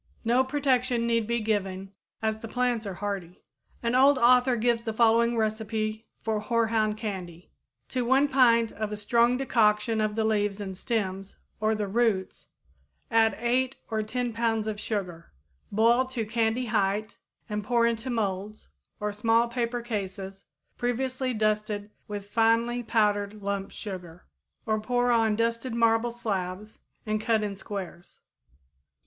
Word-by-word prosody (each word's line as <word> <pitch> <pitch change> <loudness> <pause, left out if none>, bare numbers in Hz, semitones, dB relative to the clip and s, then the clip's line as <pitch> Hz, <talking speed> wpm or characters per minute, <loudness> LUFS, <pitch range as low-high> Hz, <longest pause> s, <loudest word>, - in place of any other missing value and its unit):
No 245 +3 +4
protection 255 -3 +1
need 230 -2 +1
be 235 0 0
given, 195 -3 -2 0.3
as 220 0 0
the 225 - -7
plants 245 -2 -1
are 190 - -5
hardy. 195 -3 -5 0.4
An 235 +1 0
old 270 +2 +6
author 250 +1 +5
gives 235 0 +1
the 225 -1 -4
following 235 +1 +3
recipe 220 0 -2 0.2
for 220 -1 0
hoarhound 220 -1 +1
candy: 185 -6 -6 0.4
To 255 -1 -1
one 265 +4 +4
pint 235 -4 +4
of 215 0 -4
a 210 - -3
strong 235 +4 +3
decoction 220 -3 +2
of 215 -1 0
the 220 - +1
leaves 210 -2 0
and 190 -2 -5
stems 195 -3 -3 0.2
or 215 +1 +1
the 210 -1 -2
roots 205 -3 0 0.6
add 225 -2 +3
8 255 +3 +1 0.2
or 220 -1 0
10 240 +2 -2
pounds 225 -1 0
of 215 -1 -3
sugar. 180 -7 -4 0.4
Boil 235 +5 +4
to 255 -3 -3
candy 225 +2 0
height 210 -1 -1 0.3
and 210 0 -3
pour 235 +2 +2
into 235 +2 -1
molds 210 -2 -3 0.3
or 210 -1 -2
small 225 +3 +2
paper 235 0 -2
cases 195 -3 -5 0.3
previously 255 +2 -1
well 245 - -2
dusted 210 -1 -1 0.2
with 205 -1 -7
finely 230 +2 +2
powdered 210 -2 0
lump 200 -1 -2
sugar, 180 -4 -8 0.4
or 215 -1 +1
pour 245 +2 +1
on 225 -2 +3
dusted 230 +2 -1
marble 230 0 +3
slabs 210 -3 -4 0.3
and 215 0 -1
cut 220 -1 +1
in 205 -1 -3
squares. 190 -3 -8
220 Hz, 150 wpm, -27 LUFS, 210-235 Hz, 0.6 s, old